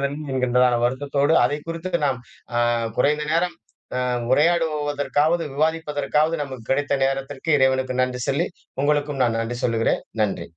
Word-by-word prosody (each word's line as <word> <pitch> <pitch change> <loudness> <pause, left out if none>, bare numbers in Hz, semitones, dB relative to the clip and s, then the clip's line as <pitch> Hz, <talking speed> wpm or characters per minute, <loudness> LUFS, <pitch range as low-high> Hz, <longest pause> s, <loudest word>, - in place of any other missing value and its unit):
என்கின்றதான 130 -3 +1
வருத்தத்தோடு 140 +4 +1
அதை 145 - 0
குறித்து 165 +2 -5 0.2
நாம் 130 -3 -1 0.4
அ - - +3 0.4
குறைந்த 150 +3 +2
நேரம் 175 +2 +1 0.4
அ - - 0 0.3
உரையாடுவதற்காவது 150 0 +1
விவாதிப்பதற்காவது 155 0 0
நமக்கு 130 -4 -7
கிடைத்த 145 +1 +1
நேரத்திற்கு 135 +3 -2
இறைவனுக்கு 130 -1 +2
நன்றி 125 0 -2
சொல்லி, 145 +6 +1 0.4
உங்களுக்கும் 145 -1 0
நான் 115 -1 0
நன்றி 120 +1 -4
சொல்லுகிறேன். 115 -1 +1 0.2
நன்றி. 105 -2 -1
145 Hz, 125 wpm, -23 LUFS, 130-155 Hz, 0.4 s, அ